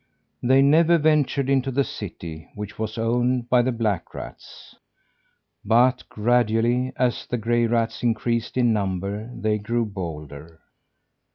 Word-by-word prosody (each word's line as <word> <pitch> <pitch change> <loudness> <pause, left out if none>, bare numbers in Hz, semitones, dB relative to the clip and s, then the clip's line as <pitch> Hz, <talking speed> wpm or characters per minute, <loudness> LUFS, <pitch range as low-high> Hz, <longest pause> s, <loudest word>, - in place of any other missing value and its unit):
They 130 +2 +4
never 165 +4 +5
ventured 150 -3 +2
into 135 -1 +1
the 135 +2 +1
city, 85 -8 -8
which 105 0 -7
was 110 0 -4
owned 120 +2 0
by 125 -1 +6
the 130 +2 0
black 110 -7 -2
rats. - - -11 0.9
But 125 +4 +2
gradually, 120 +2 +1
as 125 -1 -1
the 125 - -2
gray 120 +1 +1
rats 115 -1 -1
increased 115 0 -1
in 120 -2 +3
number 100 +2 -3
they 105 -3 -1
grew 115 +3 -1
bolder. 80 -5 -8
115 Hz, 130 wpm, -23 LUFS, 105-125 Hz, 0.9 s, by